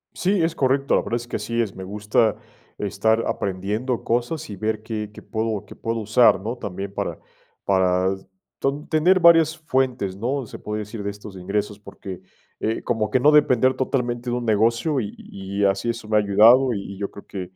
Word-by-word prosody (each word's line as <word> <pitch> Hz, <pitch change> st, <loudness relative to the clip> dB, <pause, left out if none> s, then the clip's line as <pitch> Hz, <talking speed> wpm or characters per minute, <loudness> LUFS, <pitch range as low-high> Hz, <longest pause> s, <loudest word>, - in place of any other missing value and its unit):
Sí, 190 Hz, -1 st, +1 dB
es 165 Hz, 0 st, 0 dB
correcto, 135 Hz, +1 st, +1 dB
la -, -, +4 dB
verdad 115 Hz, -, -2 dB
es 120 Hz, 0 st, -5 dB
que 120 Hz, -, -3 dB
así 115 Hz, 0 st, -3 dB
es, 105 Hz, -4 st, -4 dB
me 95 Hz, -, -7 dB
gusta 105 Hz, +3 st, +1 dB, 0.4 s
estar 110 Hz, +3 st, +1 dB
aprendiendo 105 Hz, +6 st, -2 dB
cosas 120 Hz, +5 st, -1 dB
y 100 Hz, -, -6 dB
ver 110 Hz, +2 st, -2 dB
qué 110 Hz, -2 st, -4 dB
qué -, -, -12 dB
puedo 110 Hz, -2 st, -3 dB
qué -, -, -12 dB
puedo 115 Hz, 0 st, -3 dB
usar, 110 Hz, +1 st, +4 dB
¿no?, 115 Hz, +5 st, -4 dB
también 100 Hz, -3 st, -6 dB
para -, -, -3 dB, 0.5 s
para 95 Hz, -1 st, +2 dB, 0.5 s
tan 140 Hz, +2 st, -2 dB
tener 180 Hz, +4 st, +4 dB
varias 165 Hz, -2 st, +6 dB
fuentes, 130 Hz, -10 st, -1 dB
¿no?, 130 Hz, +6 st, -2 dB
se -, -, -9 dB
puede 105 Hz, 0 st, -4 dB
decir 105 Hz, 0 st, -6 dB
de 100 Hz, -, -3 dB
estos 105 Hz, -1 st, -10 dB
ingresos, 100 Hz, +3 st, -3 dB
porque, 95 Hz, -2 st, -9 dB, 0.4 s
eh, 110 Hz, +1 st, -1 dB
como 115 Hz, -3 st, -1 dB
que 130 Hz, -, +2 dB
no 150 Hz, +4 st, +5 dB
depender 130 Hz, -4 st, +4 dB
totalmente 125 Hz, -2 st, -2 dB
de 120 Hz, -, 0 dB
un 125 Hz, -, -3 dB
negocio 115 Hz, +7 st, +2 dB
y 105 Hz, -3 st, -5 dB
y 100 Hz, +1 st, -4 dB
así 100 Hz, +3 st, +1 dB
eso 115 Hz, -1 st, -3 dB
me 110 Hz, -, +2 dB
ha -, -, +5 dB
ayudado 115 Hz, +6 st, +5 dB
y 100 Hz, -1 st, -5 dB
y 95 Hz, -, -10 dB
yo 100 Hz, 0 st, -3 dB
creo 100 Hz, -, -13 dB
que 95 Hz, -, -5 dB
110 Hz, 200 wpm, -23 LUFS, 100-125 Hz, 0.5 s, varias